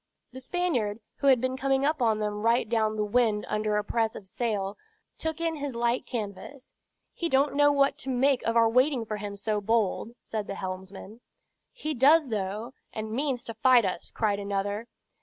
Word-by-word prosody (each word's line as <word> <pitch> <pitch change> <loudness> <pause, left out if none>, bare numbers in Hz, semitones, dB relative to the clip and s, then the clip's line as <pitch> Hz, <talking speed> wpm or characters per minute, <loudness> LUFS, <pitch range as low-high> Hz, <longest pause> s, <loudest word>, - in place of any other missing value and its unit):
The 260 - -8
Spaniard, 260 - -1 0.2
who 280 - 0
had 260 -3 +6
been 255 +1 -1
coming 270 +1 +1
upon 250 -8 +2
them 210 -1 -2
right 230 +2 +2
down 220 -1 +1
the 210 -1 0
wind 215 -1 +1
under 210 0 0
a 210 - 0
press 225 +1 0
of 200 - -9
sail, 205 -1 -2 0.4
took 320 0 -3
in 330 -1 -1
his 285 -3 -4
light 235 +1 0
canvas. 235 +4 -6 0.4
"He 340 - -2
don't 275 +1 +3
know 290 +1 +5
what 280 -1 +2
to 270 - -5
make 265 +1 +2
of 230 +1 0
our 230 0 +6
waiting 255 +1 +2
for 215 -1 -4
him 205 -1 -5
so 210 +1 -1
bold," 225 +1 0
said 215 -2 -4
the 195 - -4
helmsman. 190 +4 -7 0.5
"He 310 -11 -4
does, 290 +3 +5
though, 215 +3 -3 0.2
and 215 0 -5
means 260 +1 -1
to 230 - -6
fight 240 0 +5
us," 185 -2 -3
cried 205 -3 0
another. 200 +2 -2
230 Hz, 190 wpm, -28 LUFS, 210-265 Hz, 0.5 s, had